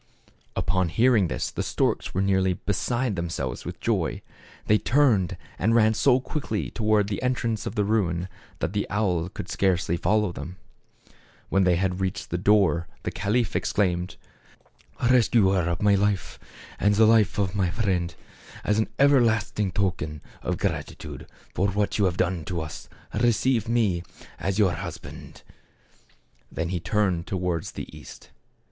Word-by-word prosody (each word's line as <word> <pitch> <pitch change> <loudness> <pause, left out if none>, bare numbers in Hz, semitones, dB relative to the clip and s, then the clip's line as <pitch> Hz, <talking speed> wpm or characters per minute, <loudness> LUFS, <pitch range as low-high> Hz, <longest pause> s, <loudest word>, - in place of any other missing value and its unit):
Upon 95 -2 +1
hearing 115 -1 +3
this - - -3
the - - -3
storks - - 0
were 95 - 0
nearly 95 -1 +2
be 100 - -2
side 120 +2 -1
themselves 80 -8 -4
with - - -6
joy. - - -1 0.4
They 105 0 +4
turned, 120 -10 +2 0.2
and 110 +5 +2
ran 110 -1 +5
so 125 +3 +4
quickly 130 -6 -3
toward 110 -2 +2
the 100 -2 -3
entrance 115 -4 -1
of - - -5
the 105 - +2
ruin, 90 -5 0 0.3
that 90 - -1
the 105 - -1
owl 90 -5 0
could - - -7
scarcely 90 -3 +1
follow 105 +2 +1
them. 85 +1 -7 0.9
When 95 -1 +3
he 90 - +4
had 90 +1 -1
reached 95 0 -3
the 85 - -1
door, 90 -4 +3 0.2
the - - -2
caliph 115 +2 0
ex 100 +3 0
claimed, 90 -3 0 0.5
" 125 0 -4
Rescuer 100 -8 +3
of 85 +4 -2
my 105 0 +5
life, 100 0 0 0.4
and 105 0 +3
the 110 +2 +6
life 110 -2 +4
of 100 -2 0
my 95 -4 +1
friend, 90 -4 -1 0.5
as 105 +1 +1
an 110 - 0
everlasting 115 -7 +3
token 85 -6 -2 0.2
of - - -2
gratitude - - -4 0.3
for 100 - +1
what 100 +2 -1
you 100 - +4
have 90 -1 0
done 90 -2 0
for 85 0 -3
us, 75 - -9 0.2
receive 115 0 +2
me, 110 -7 +2 0.4
as 95 +1 -1
your 100 -4 +4
husband." - - -8 1.1
Then 80 +1 -3
he 90 -1 -1
turned 95 -2 0
towards 90 -3 -2
the - - -8
east. - - -12
100 Hz, 160 wpm, -25 LUFS, 90-110 Hz, 1.1 s, the